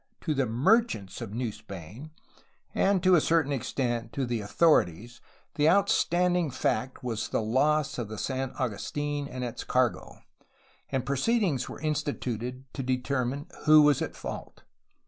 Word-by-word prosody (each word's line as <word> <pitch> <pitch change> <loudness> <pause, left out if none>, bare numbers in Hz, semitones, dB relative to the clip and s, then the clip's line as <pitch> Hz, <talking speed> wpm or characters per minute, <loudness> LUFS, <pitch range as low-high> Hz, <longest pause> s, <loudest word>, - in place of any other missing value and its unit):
To 155 - -1
the 135 -3 0
merchants 120 - +1
of - - -5
New 120 -2 -1
Spain 105 - -10 0.6
and, 195 -2 +2
to 185 0 +5
a 170 - +6
certain 160 -3 +2
extent, 120 -3 -2
to 135 - -1
the 120 -2 -2
authorities 115 - +2 0.3
the 150 +1 +3
out 200 +3 +4
standing 175 -1 +2
fact 130 0 -2
was 115 -3 -2
the - - 0
loss 135 +6 +1
of 120 - -3
the 110 +1 -7
San 130 +3 -2
Agustin 145 +5 -2
and 125 -2 -6
its 120 -2 -5
cargo, 125 -2 0 0.7
and 130 -2 -1
proceedings 140 - +1
were - - -8
instituted 130 -5 -3
to 135 - -4
determine 130 +2 -1 0.2
who 155 0 +8
was 145 -2 +4
at - - -3
fault. - - -8
130 Hz, 150 wpm, -28 LUFS, 120-150 Hz, 0.7 s, who